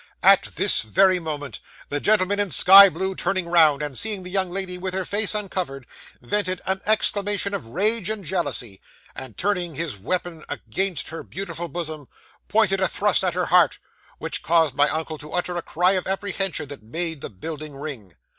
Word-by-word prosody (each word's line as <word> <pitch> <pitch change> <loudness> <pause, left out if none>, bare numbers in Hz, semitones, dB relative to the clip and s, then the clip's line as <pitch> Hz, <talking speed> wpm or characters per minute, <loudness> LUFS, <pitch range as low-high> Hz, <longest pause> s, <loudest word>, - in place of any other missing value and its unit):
'At - - +5
this - - +3
very 185 - +3
moment, 145 -6 -5 0.3
the 145 - -2
gentleman 205 +2 +2
in 205 -1 0
sky 195 +3 +8
blue 190 +1 -3
turning 185 -1 -1
round, 155 -4 +4
and 145 -3 -4
seeing 205 - -1
the 180 - -7
young 190 -1 0
lady 185 0 -2
with 185 +1 -3
her 190 -1 -2
face 205 +1 +1
uncovered, 180 - -4 0.3
vented 185 +7 -1
an 190 0 -1
exclamation 205 -1 +2
of 195 - -4
rage 205 - +1
and 215 -3 -4
jealousy, 145 - -3 0.3
and, 130 -5 -8
turning 180 -5 -1
his 155 -6 -3
weapon 165 - -4
against 190 -6 -2
her 165 - -7
beautiful 175 -3 -6
bosom, 155 -3 -6 0.4
pointed 210 -3 +2
a 190 - +2
thrust 200 0 +2
at 180 -2 -1
her 180 -1 0
heart, 180 -1 +3 0.4
which - - -2
caused 165 -2 +2
my 145 +1 +3
uncle 160 -1 -4
to 150 - -9
utter 180 0 -2
a 175 - -2
cry 180 +3 +1
of 185 -2 -1
apprehension 195 -4 -2
that 145 -4 -9
made 160 +6 -3
the - - -5
building 150 - -8
ring. 135 - -8
180 Hz, 185 wpm, -23 LUFS, 155-195 Hz, 0.4 s, sky